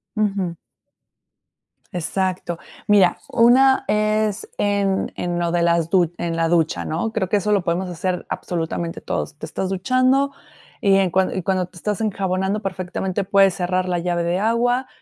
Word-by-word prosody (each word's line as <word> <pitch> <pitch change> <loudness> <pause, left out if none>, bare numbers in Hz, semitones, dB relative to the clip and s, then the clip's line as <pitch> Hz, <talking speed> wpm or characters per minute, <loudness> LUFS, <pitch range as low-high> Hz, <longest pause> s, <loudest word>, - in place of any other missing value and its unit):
Ujú. 195 -5 -1 1.4
Exacto. 180 0 -2 0.3
Mira, 195 -4 +5
una 260 +4 +5
es 215 0 0
en 200 -1 0
en 175 -1 -2
lo 170 -1 0
de 175 0 +1
las 170 -1 +2
du 175 -3 +3
en 170 -1 -2
la 165 0 +1
ducha, 165 -1 +1
¿no? 170 +8 -2
Creo 205 -4 -2
que 205 - +3
eso 210 +1 -1
lo 200 -3 +2
podemos 175 +2 -1
hacer, 180 +1 -3
absolutamente 165 0 -3
todos. - - -3
Te - - -5
estás 185 +3 -3
duchando, 255 +8 +2 0.5
y 200 -4 +4
en 195 -1 +2
cuan 185 +1 +1
cuando 185 +1 0
te 180 0 -17
estás 210 +3 -2
enjabonando, 195 -1 -1
perfectamente, 190 0 -3
puedes 195 -1 +4
cerrar 185 0 -1
la 175 - +1
llave 175 0 -1
de 175 +2 0
agua. 240 +4 +1
190 Hz, 160 wpm, -21 LUFS, 175-210 Hz, 1.4 s, Mira